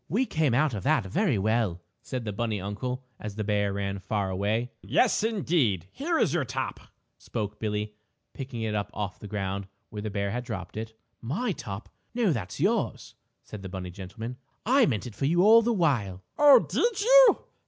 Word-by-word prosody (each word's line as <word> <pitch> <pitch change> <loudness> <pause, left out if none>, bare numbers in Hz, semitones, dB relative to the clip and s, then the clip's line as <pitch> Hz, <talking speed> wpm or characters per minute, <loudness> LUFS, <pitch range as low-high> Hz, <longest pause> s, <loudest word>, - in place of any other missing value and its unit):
"We 230 +10 +2
came 155 - +1
out 145 0 +2
of 100 - -3
that 95 - +2
very 130 - +1
well," 105 -3 +1 0.2
said 125 -3 -5
the 105 - -3
bunny 110 -1 -1
uncle 125 +7 -4 0.2
as 105 -2 -6
the 110 - -2
bear 100 -1 +1
ran 100 0 -3
far 100 0 -2
away. 105 +6 -1
"Yes, 235 -3 +2
indeed, 170 - +1
and 95 - -26
here 330 +4 -1
is - - +2
your 175 -4 +1
top," 130 +1 -4 0.4
spoke 105 -1 -4
Billie, 105 -1 -2 0.4
picking 130 -4 -5
it 110 -1 -1
up 100 -1 -1
off 100 -3 -4
the 105 - -8
ground 100 -1 -3 0.2
where 105 -2 -5
the 110 - -3
bear 100 -1 -2
had 120 +3 -3
dropped 100 -7 -6
it. 110 +1 -6 0.2
"My 185 - -1
top? 100 - -6 0.3
No 225 -8 +3
that's 95 -8 -5
yours," - - 0 0.3
said 105 - -9
the 95 - -7
bunny 90 -1 -6
gentleman. 110 +7 -7 0.3
"I 255 +1 +5
meant 110 -1 -1
it 120 - -7
for 135 - -2
you 175 +5 +3
all 225 +3 +8
the 235 +1 +1
while." 120 - 0
"Oh, 290 -1 +8
did 460 -3 0
you? - - +7
110 Hz, 195 wpm, -27 LUFS, 100-155 Hz, 0.4 s, all